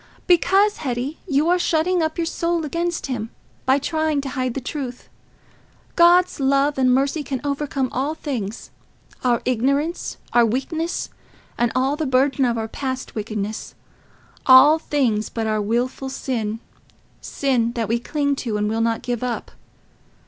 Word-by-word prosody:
"Because, 390 +4 +4
Hetty, 260 +2 -3
you 295 0 +2
are 360 +1 +3
shutting 345 +2 +1
up 315 0 -1
your 335 - 0
soul 335 0 -1
against 340 +3 -2
him, 230 -5 -3 0.4
by 265 +1 +5
trying 315 +1 0
to 275 - -5
hide 255 -3 -2
the - - -1
truth. 255 -2 -6 0.9
God's 350 0 +5
love 275 +1 +2
and 255 -1 +4
mercy 275 +4 +1
can 275 -3 -3
overcome 280 -2 -1
all 280 +5 -1
things—our 240 -1 -4
ignorance, 275 +7 0 0.2
and 235 -2 +4
weakness, 320 +7 -2 0.4
and 240 -1 +1
all 265 +3 +2
the 310 -1 -2
burden 265 +1 +2
of 235 -1 0
our 220 0 -2
past 260 +2 -4
wickedness—all 225 +6 +1
things 245 -9 0
but 225 -1 -3
our 215 -1 0
wilful 245 +5 -1
sin, 225 -5 -3 0.6
sin 245 -4 0
that 230 -3 -2
we 230 +1 +1
cling 285 +3 -1
to, 225 -6 -2
and 210 0 0
will 225 +1 0
not 230 0 0
give 245 -2 -2
up. 250 -1 -3
265 Hz, 150 wpm, -22 LUFS, 240-305 Hz, 0.9 s, by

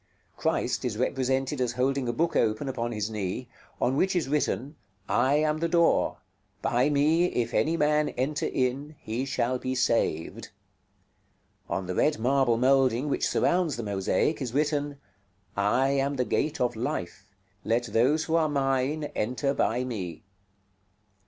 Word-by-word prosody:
Christ - - -1
is 115 -4 -2
represented 130 +2 0
as 120 -1 0
holding 130 +1 0
a - - +2
book 165 +8 0
open 110 +4 +1
upon 120 -3 -2
his 105 -2 -2
knee, 105 +3 -3 0.3
on 130 - +1
which 190 +6 +1
is 170 -6 0
written: 145 0 -1 0.3
"I 130 +4 +2
AM 155 +1 +1
THE 170 - +1
DOOR; 170 0 +3 0.5
BY 125 +4 +2
ME 150 +4 +3
IF 120 -9 -1
ANY 165 +2 +2
MAN 150 0 +2
ENTER 140 +4 -1
IN, 135 +4 -2
HE 115 +5 -3
SHALL 125 -1 -1
BE 130 +1 -3
SAVED." 100 -10 0 1.2
On 95 - -2
the 90 - -3
red 150 +10 +2
marble 125 0 +2
moulding 130 +1 +3
which - - 0
surrounds 175 -5 +1
the 120 - -4
mosaic 100 +9 0
is 125 -2 -4
written: 145 -1 0 0.6
"I 105 +7 +2
AM 140 +1 0
THE 125 -2 0
GATE 155 +5 -1
OF 125 -1 0
LIFE; 95 -4 -4 0.4
LET 115 +2 +1
THOSE 125 +8 +2
WHO 160 - -1
ARE 160 -2 +2
MINE 135 +1 0
ENTER 125 +5 -1
BY 125 -2 0
ME." 95 -10 -5
130 Hz, 155 wpm, -27 LUFS, 120-150 Hz, 1.2 s, DOOR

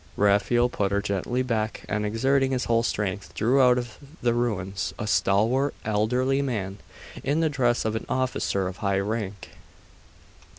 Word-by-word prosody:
Raphael 105 +4 +3
put 100 -5 -1
her 100 - +2
gently 100 +5 -1
back 110 -4 -2
and 105 0 -1
exerting 135 +5 +2
his 125 - -1
whole 115 0 +2
strength, 100 -4 -3
drew 130 +5 +3
out 125 -1 +5
of 120 -2 -5 0.2
the 120 -1 +3
ruins 100 -6 -2
a - - -3
stalwart 115 +7 +2
elderly 125 +6 +1
man, 105 -7 -3 0.4
in 145 +4 +1
the 160 - +2
dress 120 -5 +1
of 110 0 0
an 110 - -4
officer 130 -6 0
of 95 +1 -6
high 100 -1 0
rank. 100 -1 -4
115 Hz, 160 wpm, -25 LUFS, 100-125 Hz, 0.4 s, out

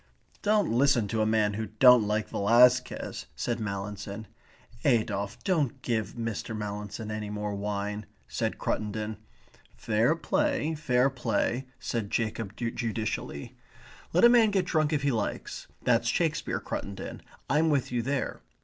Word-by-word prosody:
"Don't 210 - +2
listen 125 -3 +3
to 110 -1 0
a 110 - +2
man 110 -2 +2
who 110 +1 -3
don't 125 -4 +7
like 105 +1 0
Velasquez," 125 +4 +3
said 115 +10 -2
Mallinson. 100 0 -5 0.6
"Adolphe, 100 -3 +1
don't 150 -8 0
give 110 -3 -1
Mr. 115 -1 -4
Mallinson 105 +1 -5
any 105 -1 -4
more 105 0 -3
wine," 105 +1 -3 0.2
said - - -2
Cruttendon. 105 0 -2 0.6
"Fair 115 +8 +2
play, 280 - 0
fair 135 -3 +2
play," 120 +1 -1
said 110 -4 -3
Jacob 110 -2 -2
judicially. 115 - -3 0.6
"Let 180 +7 +5
a - - +9
man 235 -3 +6
get 195 -3 +1
drunk 155 -3 +1
if 150 -2 0
he 140 - +2
likes. 110 -4 -3 0.2
That's - - +3
Shakespeare, - - 0
Cruttendon. 100 -1 -6 0.3
I'm 155 +3 +3
with 140 -5 +1
you 120 -1 0
there. 135 +3 -2
115 Hz, 140 wpm, -28 LUFS, 105-135 Hz, 0.6 s, a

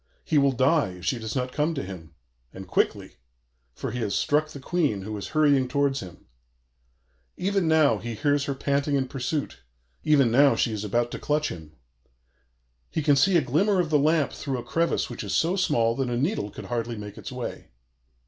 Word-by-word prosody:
He 155 - +3
will 140 -1 +4
die 130 - +2
if 90 -1 -11
she 115 +7 0
does 110 +2 -5
not 125 -1 -1
come 155 +3 0
to 140 - -3
him, 85 -4 -9 0.4
and 95 0 -10
quickly; - - -1 0.6
for - - -4
he 125 - -4
has 105 -4 -1
struck 155 +1 +1
the 145 - -9
Queen, 140 - -1
who 110 +2 -5
is 100 - -5
hurrying 145 -4 +3
towards 140 +1 +1
him. 90 -2 -11 1.1
Even 195 -1 0
now 155 -9 +4
he 115 +1 -5
hears 145 +3 +1
her 140 - -2
panting 140 +1 0
in 135 -1 0
pursuit; 135 +3 -3 0.4
even 140 -6 +4
now 140 +3 +5
she 115 - 0
is 105 -1 -4
about 120 +3 0
to - - -5
clutch 150 +1 0
him. 80 -3 -9 1.2
He 160 - -2
can 145 -1 +4
see 175 +7 +4
a - - +4
glimmer 190 - +2
of 165 -3 0
the 150 - +4
lamp 155 0 +2
through 135 -3 -3
a 120 - -5
crevice 170 +1 0
which 120 - -7
is 95 -3 -2
so 165 - +2
small 120 -12 +1
that 135 -2 -1
a 120 - -1
needle 140 - -1
could - - -9
hardly 120 -1 -3
make 105 -1 -8
its - - -7
way. - - -6
135 Hz, 205 wpm, -26 LUFS, 115-155 Hz, 1.2 s, now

